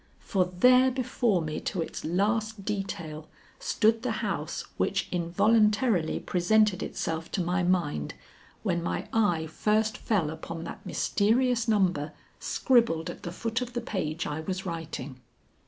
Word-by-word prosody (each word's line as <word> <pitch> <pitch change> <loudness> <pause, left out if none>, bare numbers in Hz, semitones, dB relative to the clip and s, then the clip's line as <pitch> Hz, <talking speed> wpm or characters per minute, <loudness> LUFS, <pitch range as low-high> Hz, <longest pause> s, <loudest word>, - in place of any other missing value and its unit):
For 190 -3 +1
there 250 +9 +5
before 245 -7 0
me 155 -1 -3
to 185 - -3
its - - -7
last 210 +4 0
detail, 170 -7 -4 0.3
stood 225 +1 +2
the - - -1
house - - -3
which - - 0
involuntarily 205 +2 +2
presented 200 +2 +2
itself 160 0 -3
to 185 - 0
my 180 +2 0
mind, 175 - 0 0.5
when 175 -5 0
my 170 - -3
eye 190 -8 +2
first 215 +6 0
fell 180 -9 0
upon 165 +1 -6
that - - -8
mysterious 235 +3 +2
number 180 -9 +1 0.3
scribbled 180 -10 +2
at - - -12
the 170 - -5
foot 230 +6 -2
of 245 -1 -5
the 240 - -1
page 165 -8 -3
I 150 +1 -3
was 185 +4 -4
writing. 160 -6 -5
190 Hz, 140 wpm, -28 LUFS, 165-220 Hz, 0.5 s, there